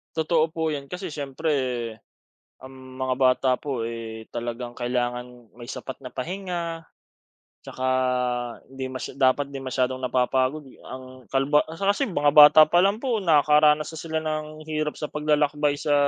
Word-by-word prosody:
Totoo 160 0 +2
po 160 -1 -1
'yan, 140 -2 -5
kasi 180 0 -6
siyempre, 145 +2 -3 1.1
ang 130 0 -11 0.3
mga 130 0 0
bata 130 0 +3
po, 135 -5 -4
eh, 115 -1 -7
talagang 120 +1 -5
kailangan 125 -1 -3
may 120 - -9
sapat 130 +1 -7
na 130 -2 -10
pahinga, 170 +1 -4 0.8
tsaka 130 0 -5 0.9
hindi 130 -1 -5
masya 130 -1 -6
dapat 135 +1 +3
'di 135 - -5
masyadong 130 0 -1
napapagod, 130 +3 0 0.2
ang 130 -2 -11
kalba 135 +2 +3
kasi 200 - 0
mga 145 -5 +2
bata 150 +1 +9
pa 175 +2 +4
lang 200 +2 +2
po 240 -5 -1
nakakaranas 150 -1 +4
na 160 - -7
sila 160 -1 -3
ng 155 0 -5
hirap 155 -1 -2
sa 150 - -4
paglalakbay 150 -1 +1
sa, 150 -1 0
145 Hz, 145 wpm, -24 LUFS, 130-155 Hz, 1.1 s, bata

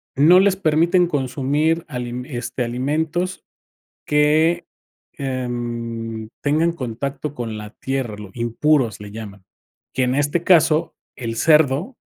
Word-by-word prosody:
no 160 +7 +7
les 195 0 +4
permiten 175 +1 +3
consumir 145 +3 0
alime 125 0 -5
este, 125 +1 -3
alimentos 155 +9 -2 0.6
que, 155 +3 +3 0.5
em, 120 -4 -4
tengan 155 +4 +2
contacto 140 +1 -4
con 115 -3 -4
la 105 -1 -8
tierra, 130 -4 -3
lo 105 -2 -9
impuros 120 +1 +1
le 105 -1 -9
llaman. 100 -3 -9 0.5
Que 130 - +1
en 125 +1 +1
este 145 +4 +1
caso 165 -2 +4 0.2
el 115 -3 -4
cerdo, 155 - +3
135 Hz, 120 wpm, -21 LUFS, 120-160 Hz, 0.6 s, no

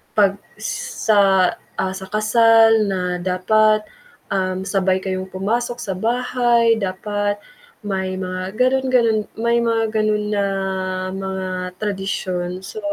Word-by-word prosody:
pag, 200 -2 +3 0.2
sa, 200 - +2 0.2
ah, 185 - 0
sa 190 0 -7
kasal 225 0 +5
na 190 -2 -1 0.2
dapat, 215 +4 +2 0.5
um, 185 -1 -1
sabay 190 -1 +1
kayong 185 0 -3
pumasok 235 +6 -2
sa 195 - -3
bahay, 235 +1 +2
dapat 205 +1 -2 0.5
may 190 -2 -2
mga 185 +3 -5
ganun, 265 +1 +2
ganun. 230 -3 +3 0.2
May 235 +1 +2
mga 225 -1 +1
ganun 215 -1 0
na 200 0 +1 0.7
mga 190 -1 -4 0.3
tradisyon. 185 -3 -3
So, 190 +3 -8
205 Hz, 115 wpm, -20 LUFS, 190-225 Hz, 0.7 s, kasal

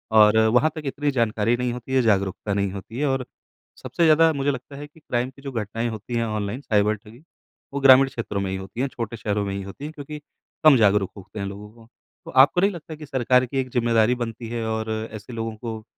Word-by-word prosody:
और 105 0 +7 0.2
वहाँ 155 +5 +5
तक 155 - -5
इतनी 145 +1 -1
जानकारी 115 -2 +1
नहीं 125 -1 -1
होती 125 +2 -7
है 130 - +4
जागरूकता 100 -2 0
नहीं 100 -1 0
होती 105 +6 -8
है 150 - +1
और 135 -1 -1 0.6
सबसे 170 - -1
ज़्यादा 160 +1 +6
मुझे 140 0 0
लगता 135 +1 -8
है 145 +1 -8
कि 155 +2 -21
क्राइम 125 -4 -2
की 135 +1 -17
जो 135 -1 -6
घटनाएँ 115 0 -3
होती 110 +2 -6
हैं 115 - 0
ऑनलाइन 110 +3 -3
साइबर 105 -3 +2
ठगी 110 +7 -16 0.5
वो 140 - -1
ग्रामीण 135 0 +8
क्षेत्रों 115 -6 -4
में 95 - -2
ही 95 - -2
होती 95 +6 -6
हैं 140 - +1
छोटे 115 -3 -5
शहरों 105 -1 -1
में 100 - -3
ही 100 - -4
होती 100 +9 -10
हैं 155 - -7
क्योंकि 150 +1 -8 0.4
कम 155 -4 +8
जागरूक 105 -3 +3
होते 100 +2 -10
हैं 100 - -2
लोगों 100 +1 -8
को। 115 0 -18 0.4
तो - - -8
आपको 160 +6 +4
नहीं 200 +1 +3
लगता 160 -2 -8
कि 150 0 -10
सरकार 125 -1 +2
की 135 +2 -5
एक 130 -1 -2
ज़िम्मेदारी 115 -1 +2
बनती 115 0 -4
है 115 -1 -3
और 110 0 -2 0.2
ऐसे 110 +3 -9
लोगों 115 -1 -4
को 110 -1 -6
115 Hz, 235 wpm, -23 LUFS, 105-135 Hz, 0.6 s, ग्रामीण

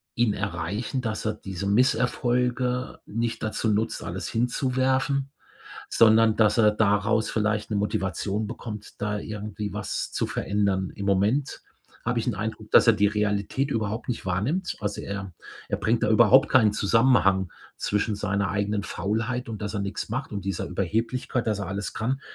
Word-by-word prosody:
ihn 115 -3 +2
erreichen, 100 +6 -3
dass 110 -3 -3
er 110 - +1
diese 95 -2 -5
Misserfolge 125 +2 +1
nicht 115 +2 -3
dazu 110 +1 -1
nutzt, 110 +2 0
alles - - -4
hinzuwerfen, 130 +3 0 0.6
sondern 110 -1 +5
dass 105 0 +3
er 105 -2 +6
daraus 105 +1 +2
vielleicht 110 0 -1
'ne 105 - 0
Motivation 100 +1 -1
bekommt, 105 -2 -8
da 105 0 -1
irgendwie 105 -1 -5
was 105 - -3
zu - - -1
verändern? 100 -2 0
Im 100 -1 -5
Moment 105 +9 +1 0.4
habe 120 - 0
ich - - -5
'n 120 - 0
Eindruck, 110 +1 -5
dass - - +6
er 115 - +8
die 105 -1 +3
Realität 105 +6 -1
überhaupt 110 +1 -2
nicht 120 -5 -3
wahrnimmt. 115 - -1
Also 100 0 -3
er 100 -2 -5 0.4
er - - 0
bringt 115 +2 0
da 105 - +1
überhaupt 130 +5 +6
keinen 110 -5 +5
Zusammenhang 100 -4 +3 0.3
zwischen 105 +1 0
seiner 100 0 -1
eigenen 100 +1 -1
Faulheit 110 +8 -2
und, 110 -2 -6
dass 105 +1 -4
er 100 - -1
nix 100 +2 -4
macht 125 +3 -4
und 100 -2 -4
dieser 95 - -2
Überheblichkeit, 115 +5 -1
dass 105 -2 0
er 100 - -4
alles 100 +1 -4
kann, 130 +5 -1
110 Hz, 165 wpm, -26 LUFS, 100-120 Hz, 0.6 s, er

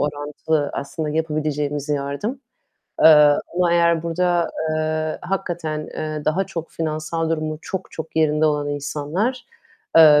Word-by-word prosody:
orantılı 145 +1 -1
aslında 140 +3 -4
yapabileceğimiz 150 -2 -1
yardım. 145 - -2 0.6
Eee, - - +9 0.5
ama 175 -1 +3
eğer 170 -1 +3
burada, 175 0 +1 0.2
eee, 155 0 -1
hakikaten, 175 -5 -3
eee, 155 -1 -4
daha 180 +5 +1
çok 165 -3 -6
finansal 160 +1 -2
durumu 155 -1 -2
çok, 190 -1 -5
çok 160 0 -8
yerinde 155 0 +3
olan 150 -1 0
insanlar 150 - -2 0.5
eee, 155 -2 +9
155 Hz, 125 wpm, -22 LUFS, 150-170 Hz, 0.6 s, Eee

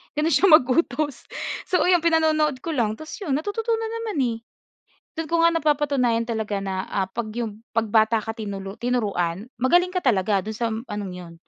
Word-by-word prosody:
gano'n 310 +2 +1
siya 325 +9 +5
mag-utos. 290 -1 +3 0.4
So, 360 - +2
ayun 360 -1 +4
pinanonood 310 -4 +2
ko 335 - -3
lang, 220 -4 +1
tapos 315 - -8
'yon 300 -9 0
natututunan 450 - -2
naman 430 -7 -4
eh. 230 -2 -1 0.8
Do'n 325 -2 -3
ko 335 0 +2
nga 335 - +4
napapatunayan 280 -7 +1
talaga 220 -3 -2
na, 190 -1 -3
ah, 195 -1 0
'pag 215 +3 -4
'yong 225 -2 -4
'pag 230 -1 +2
bata 220 +1 +4
ka 225 - -4
tinulu 200 -3 -6
tinuruan, 205 -7 -1 0.2
magaling 355 +7 +3
ka 365 - 0
talaga 205 -4 +2
dun 220 0 -5
sa 230 -1 -1
anong 210 -4 -5
'yon, 175 -2 -9
245 Hz, 180 wpm, -24 LUFS, 215-315 Hz, 0.8 s, siya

